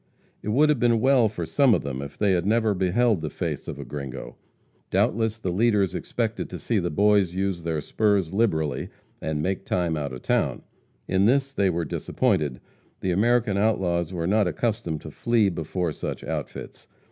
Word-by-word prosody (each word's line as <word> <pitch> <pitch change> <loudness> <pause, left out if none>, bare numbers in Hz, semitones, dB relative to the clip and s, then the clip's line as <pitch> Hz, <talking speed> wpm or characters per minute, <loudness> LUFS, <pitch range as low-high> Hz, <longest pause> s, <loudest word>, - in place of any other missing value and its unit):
It - - -5
would 145 +8 +4
have 150 -5 +2
been 115 -1 +3
well 130 -2 +4
for 90 -5 -4
some 135 - +4
of - - -2
them 70 -1 -4
if 70 +1 -8
they 105 -2 +2
had 90 -2 +2
never 110 +1 +2
beheld 95 +2 +2
the 75 - -3
face - - -4
of - - -5
a - - -7
gringo. 70 -4 -7 0.5
Doubtless 110 0 +1
the 95 -5 -3
leaders 100 -1 +2
expected - - -3
to - - -6
see - - 0
the - - -1
boys 100 0 +3
use 95 -2 -1
their 80 -2 -2
spurs 100 0 +1
liberally 80 -9 0 0.3
and 75 -1 -2
make 95 +2 -1
time 85 -4 0
out 75 -2 -3
of 65 -1 -8
town. - - 0 0.4
In 95 +1 +2
this 135 +4 +2
they 100 -6 +2
were 85 -1 -1
disappointed. 70 -5 0 0.4
The 95 - 0
American 110 +1 +2
outlaws 90 -5 +1
were 85 -3 -3
not 105 +2 +3
accustomed 90 -2 -2
to - - -9
flee 115 -4 +2
before 85 0 -2
such - - -5
"outfits." - - -6
95 Hz, 185 wpm, -25 LUFS, 85-110 Hz, 0.5 s, would